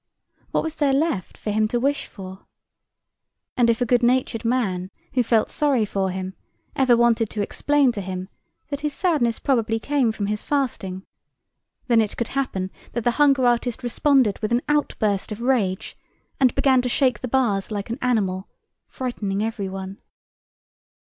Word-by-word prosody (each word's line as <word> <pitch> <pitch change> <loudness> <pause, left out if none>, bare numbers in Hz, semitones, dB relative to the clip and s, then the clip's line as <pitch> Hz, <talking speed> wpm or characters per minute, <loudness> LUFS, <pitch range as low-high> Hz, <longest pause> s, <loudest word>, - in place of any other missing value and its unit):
What - - 0
was 320 - -3
there 285 -3 +2
left 285 - -1
for 210 - -3
him 215 +1 +2
to 240 +2 -1
wish 280 +3 0
for? 190 -2 -11 1.1
And 240 -2 +3
if 230 +1 +1
a - - +3
good 245 +1 +3
natured 245 -2 +1
man 205 -7 0 0.2
who 255 - +3
felt 230 -2 +2
sorry 275 -7 +2
for 195 -2 -1
him 185 0 -4 0.4
ever 255 -3 +4
wanted 235 -2 +3
to 210 - -2
explain 285 +4 +2
to 210 - -5
him 185 0 -5 0.4
that 285 0 -4
his 300 -1 -2
sadness 280 -10 +1
probably 225 -4 +1
came 265 0 +1
from 210 -2 -3
his 210 +1 -2
fasting, 210 -10 -2 0.8
then 235 -2 +4
it 215 - -3
could 235 - -2
happen 190 -9 -2 0.2
that 235 - -2
the 240 - +3
hunger 275 -3 +5
artist 245 0 +1
responded 250 -2 +2
with 215 +1 -3
an 240 +2 +2
outburst 215 -9 0
of 210 - -5
rage 230 -8 0 0.4
and 255 -3 +3
began 260 -2 +4
to 250 - -2
shake 255 0 +2
the 255 - -4
bars 230 -6 +1
like 210 +1 -4
an 235 - -4
animal, 200 -7 0 0.4
frightening 210 -6 -3
everyone. 195 -3 -4
235 Hz, 170 wpm, -23 LUFS, 205-260 Hz, 1.1 s, hunger